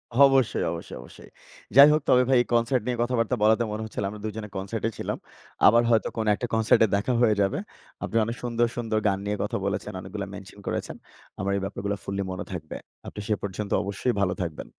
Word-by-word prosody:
অবশ্যই, 135 -3 +4
অবশ্যই, 85 - -7
অবশ্যই। - - -14 0.5
যাই 140 +2 +11
হোক 155 - +2
তবে 125 0 +6
ভাই 130 - +5
এই - - -2
কনসার্ট 120 +1 +2
নিয়ে 125 -1 -1
কথাবার্তা 120 0 0
বলাতে 110 +2 +4
মনে 110 +1 -4
হচ্ছিল 105 - -5
আমরা 105 0 -8
২ 110 - -2
জনে 105 -1 -6
কনসার্টে 110 +4 -2
ছিলাম। - - -3 0.5
আবার 115 +2 +6
হয়তো 115 -1 +3
কোন 110 - 0
একটা 120 - -4
কনসার্টে 110 0 +4
দেখা 115 +5 0
হয়ে 110 -3 +4
যাবে। 100 - +1 0.4
আপনি 115 - -1
অনেক 115 +2 -3
সুন্দর, 120 0 +1
সুন্দর 110 -2 0
গান 95 -1 +2
নিয়ে 105 0 -1
কথা - - -2
বলেছেন, - - -2
অনেকগুলা 100 +1 -6
মেনশন 100 +1 -11
করেছেন। - - -3 0.4
আমার 100 +1 -1
এই - - -3
ব্যাপারগুলা 100 +1 -3
ফুল্লি 100 0 -3
মনে 90 - -5
থাকবে। 80 -4 -6 0.3
আপনি - - -8
সে 110 - +2
পর্যন্ত 100 +1 -4
অবশ্যই 100 +5 -1
ভালো 90 -2 +2
থাকবেন। 80 -3 -6
110 Hz, 205 wpm, -26 LUFS, 100-120 Hz, 0.5 s, যাই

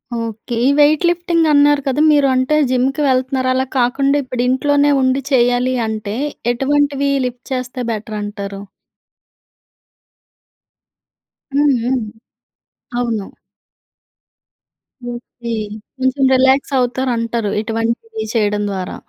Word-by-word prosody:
Okay. 230 0 -5
ఈ - - +4
weight 295 +1 +5
lifting 345 -1 +1
అన్నారు 290 0 +4
కద! 270 - 0
మీరు 290 -2 +4
అంటే 260 +4 +1
జిమ్‌కి 260 +3 0
వెళ్తున్నారు 260 0 +1
అలా 260 0 0
కాకుండా 275 +3 +2
ఇప్పుడు 250 -1 -3
ఇంట్లోనే 285 +2 +2
ఉండి 260 +1 +1
చేయాలి 245 0 +2
అంటే 215 -1 -4 0.4
ఎటువంటివి 280 +2 +1 0.2
లిఫ్ట్ 250 0 -6
చేస్తే 255 0 -4
బెటరంటారు. 205 -2 -5 2.9
హ్మ్, 285 -1 +3
హ్మ్. 255 +2 0 1.0
అవును. 225 -5 -2 1.8
ఓకే. 240 0 -8 0.5
కొంచెం 260 +1 0
రిలాక్సవుతారు 260 -1 +2
అంటరు. 230 -2 -2
ఇటువంటివి 225 0 -3
చేయడం 210 -2 +1
ద్వారా. 185 -2 -4
255 Hz, 95 wpm, -17 LUFS, 230-275 Hz, 2.9 s, weight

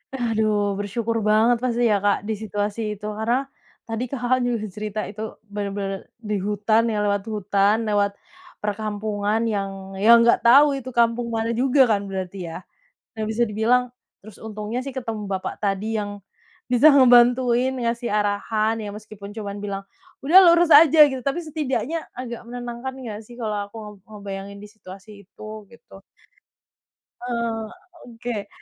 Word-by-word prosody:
Aduh 215 -4 0
bersyukur 225 +3 -2
banget 220 +3 +3
pasti 245 -1 0
ya 200 - +3
Kak, 205 0 +1
di 220 - -2
situasi 210 0 -3
itu 205 - -11
karena, 230 +5 0 0.4
tadi 225 +1 -4
Kakak, 255 0 0
juga 240 -3 -1
cerita 210 +2 -5
itu 220 +1 -7 0.2
benar-benar 200 -1 -4
di 210 -2 -4
hutan 210 +3 +1
ya 210 -1 -1
lewat 200 -1 0
hutan 205 +1 +1
lewat 205 -1 +2 0.5
perkampungan 210 +1 -2
yang 200 -3 -1 0.3
yang 230 +4 +7
nggak 235 - +4
tahu 280 +5 +8
itu 260 0 -8
kampung 235 0 +2
mana 225 +1 -1
juga 260 +3 +3
kan 200 -1 0
berarti 190 0 -5
ya, - - -6 0.6
nah 220 - -3
bisa 235 +2 +1
dibilang 220 +4 +2 0.4
terus 215 0 -14
untungnya 215 +3 -4
sih 275 - -6
ketemu 225 -5 -5
bapak 190 -1 -3
tadi 205 +2 -1
yang, 205 0 -5 0.5
bisa 250 +5 +6
ngebantuin 245 -1 +5
ngasih 235 0 -2
arahan 210 +1 0
ya 205 - -5
meskipun 210 -1 -10
cuma 205 -2 -6
bilang, 200 -1 -4 0.4
"Udah 310 +7 +5 0.2
lurus 340 0 +4
aja," 310 0 +8
gitu 265 - -4
tapi 275 +5 0
setidaknya 310 0 -3
agak 240 -2 -7
menenangkan 245 +1 -6
nggak 235 -5 -7
sih 240 - -14
kalau 215 -2 -2
aku - - -17
ngeb 210 -1 -10
ngebayangin 200 -1 -8
di 210 - -10
situasi 195 -1 -13 0.2
itu 215 +2 -12 0.2
gitu 215 -4 -16 1.2
Eee, 230 -2 -3 0.4
oke. 230 -3 -6
220 Hz, 150 wpm, -23 LUFS, 205-240 Hz, 1.2 s, tahu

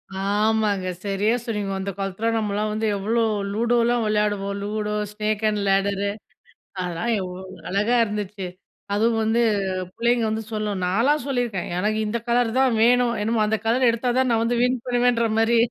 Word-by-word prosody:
ஆமாங்க, 205 -1 +1 0.2
சரியா 200 +2 +1
சொனனீங்க. 210 -4 -3
அந்த 195 +1 -3
காலத்துல 195 +3 -3
நம்மலாம் 210 0 -1
வந்து 220 +1 -1
எவ்ளோ 225 +4 0 0.3
லூடோலாம் 235 +1 +2
விளையாடுவோம், 210 -2 0
லூடோ 210 0 -2 0.2
ஸ்னேக் 215 0 -2
அண்ட் 210 -1 -1
லேடரு 195 +1 +1 0.7
அதெல்லாம் 180 +5 -2
எவ்ளோ 185 -1 -6 0.3
அழகா 210 +6 +2
இருந்துச்சு. 205 -2 -4 0.5
அதுவும் 225 +2 +2
வந்து 225 +2 +2 0.6
பிள்ளைங்க 235 0 +2
வந்து 220 +1 -2
சொல்லும், 210 -3 -2
நான்லாம் 240 +10 +2
சொல்லியிருக்கேன் 245 -8 -2
எனக்கு 215 +3 0
இந்த 230 +3 -1
கலர் 240 -1 +2
தான் 260 -4 +3
வேணும். 245 0 +4
என்னமோ 220 +1 +1
அந்த 220 0 0
கலர் 250 +2 +3
எடுத்தா 235 +2 -1
தான் 260 -1 +2
நான் 225 0 +2
வந்து 235 +1 0
வின் 250 -1 +1
பண்ணுவேன்ற 245 -1 +2
மாரி. 230 +1 +3
215 Hz, 155 wpm, -23 LUFS, 200-235 Hz, 0.7 s, வேணும்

